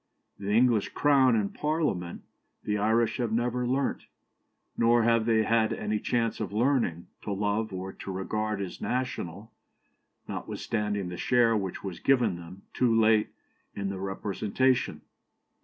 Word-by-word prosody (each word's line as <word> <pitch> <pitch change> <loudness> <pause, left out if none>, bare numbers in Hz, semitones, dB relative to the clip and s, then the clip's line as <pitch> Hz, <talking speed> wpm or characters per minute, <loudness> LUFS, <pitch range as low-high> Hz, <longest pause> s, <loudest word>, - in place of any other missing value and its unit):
The 100 0 -4
English 115 -1 +3
Crown 135 -4 +4
and 105 -3 0
Parliament 150 - -2 0.4
the 105 - -1
Irish 110 +2 +2
have 120 -4 -1
never 120 +2 0
learnt, 135 +2 -1 0.7
nor 115 0 +4
have 115 0 +3
they 110 -1 +4
had 110 0 +2
any 105 0 -2
chance 115 0 -1
of 105 -3 -3
learning, 115 -7 +1 0.2
to 105 - -5
love, 105 +2 -1
or 95 0 -5
to 95 - -7
regard 105 +2 -2
as 95 - -6
national, 120 - -3 0.8
notwithstanding 105 -4 -3
the 90 - -6
share 120 +2 +3
which 95 -4 -3
was 95 -4 -5
given 120 -8 +3
them, 85 +3 -11
too 115 -3 +3
late, 110 -1 +4 0.5
in 100 -1 -2
the 95 -1 -4
representation. 105 +6 0
110 Hz, 140 wpm, -28 LUFS, 100-120 Hz, 0.8 s, Crown